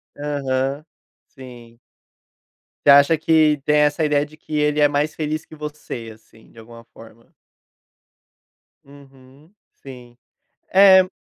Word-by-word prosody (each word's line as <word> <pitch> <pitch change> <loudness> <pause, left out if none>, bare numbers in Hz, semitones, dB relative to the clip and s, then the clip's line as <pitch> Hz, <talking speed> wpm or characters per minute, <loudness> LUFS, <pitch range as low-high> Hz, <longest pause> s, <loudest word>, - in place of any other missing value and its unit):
Aham, 140 0 -4 0.4
sim. 120 -3 -15 1.1
Você - - +4
acha 140 +3 +5
que 155 -1 +2
tem 150 0 +2
essa 150 +1 +1
ideia 145 -1 0
de 155 +1 -19
que 155 - -9
ele 150 0 0
é 145 - +5
mais 145 +1 -2
feliz 155 0 -4
que - - -15
você, 150 -6 -9
assim, 110 0 -23
de 115 - -17
alguma 115 +1 -15
forma? 115 +1 -18 1.5
Uhum, 140 +3 -20 0.2
sim. 125 -3 -15 0.5
É 190 -1 +5
145 Hz, 125 wpm, -20 LUFS, 130-150 Hz, 1.5 s, acha